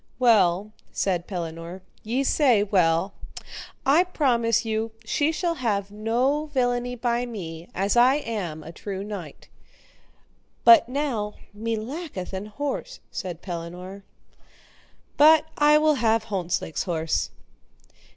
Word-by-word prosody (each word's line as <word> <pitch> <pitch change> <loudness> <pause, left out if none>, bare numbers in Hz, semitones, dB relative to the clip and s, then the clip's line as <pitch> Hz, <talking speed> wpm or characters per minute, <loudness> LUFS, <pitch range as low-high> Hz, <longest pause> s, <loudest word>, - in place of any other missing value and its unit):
Well, 210 -5 +3 0.2
said 180 -3 -1
Pellinore, 170 0 -6 0.2
ye 245 +5 -1
say 255 -7 +3
well; 185 -1 +2 0.7
I 295 +6 +5
promise 235 -9 +1
you 220 0 -2
she 290 +7 +1
shall 340 +1 -1
have 205 -9 -2
no 245 +8 0
villainy 245 -3 0
by 240 0 -1
me, 170 -7 -7
as 195 +4 0
I 250 +3 +6
am 200 - -4
true 195 +2 -5
knight; 200 -8 -8 1.2
but 340 -8 +7
now 250 -7 -2 0.2
me 225 +2 -2
lacketh 225 - -6
an 190 +2 -4
horse, 290 - -4
said 175 -3 -6
Pellinore, 180 +2 -7 1.2
but 310 +1 +7
I 300 0 +5
will 305 0 +3
have 225 -1 +3
Hontzlake's 180 -6 -2
horse. 165 -3 -1
220 Hz, 115 wpm, -25 LUFS, 185-260 Hz, 1.2 s, but